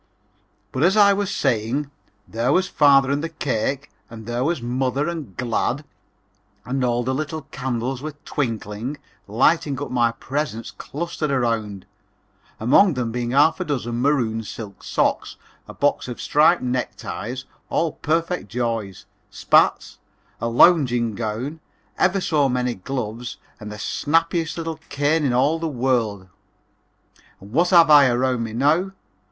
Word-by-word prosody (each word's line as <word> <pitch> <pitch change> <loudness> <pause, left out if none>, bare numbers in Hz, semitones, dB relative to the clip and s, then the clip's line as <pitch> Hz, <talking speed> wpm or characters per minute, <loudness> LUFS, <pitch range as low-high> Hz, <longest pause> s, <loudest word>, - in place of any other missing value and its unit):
But, 130 - -3
as 185 +6 +4
I 200 -1 +7
was 200 -1 -1
saying, 135 - -1 0.4
there 115 +4 -1
was 185 +4 +2
father 140 -4 +4
and 140 +2 -1
the 165 - -2
cake, 140 -2 -2 0.2
and 110 -1 -10
there 120 +2 -2
was 165 +1 0
mother 130 +4 -1
and 155 - -6
"Glad" 125 +3 -1 0.8
and 130 +3 -2
all 120 0 +1
the 130 +2 -1
little 155 +2 -4
candles 125 0 -3
were 155 0 -6
twinkling, 115 0 -3 0.3
lighting 135 +5 +2
up 145 - -5
my 120 -2 +2
presents 130 -2 -4
clustered 155 0 -4
around, 115 -7 -1 0.7
among 145 - +4
them 120 -2 -2
being 120 0 -3
half 145 +7 +4
a - - 0
dozen 120 -7 -3
maroon 125 -6 +1
silk 105 -2 -9
socks, - - 0 0.3
a - - -9
box 145 -2 0
of 125 - -6
striped 155 +3 +3
neck 125 0 -2
ties, 125 +5 -6 0.2
all 165 -1 0
perfect 165 +4 -2
joys; 115 -6 -3 0.2
spats, - - +2 0.4
a 115 - -2
lounging 120 -4 +4
gown, 120 +8 -4 0.4
ever 190 +2 +3
so 145 -6 +2
many 125 -1 0
gloves 120 +2 -5 0.2
and 105 0 -8
the 105 - -7
snappiest 165 - 0
little 165 -1 -4
cane 145 +3 +1
in 135 - +1
all 140 +6 +2
the 165 - -2
world. 120 -8 -1 1.1
And 100 +2 -14
what 170 +8 +2
have 170 -4 +6
I 145 -2 +8
around 125 0 +1
me 110 -1 -5
now? 155 +10 +1
130 Hz, 145 wpm, -22 LUFS, 120-155 Hz, 1.1 s, I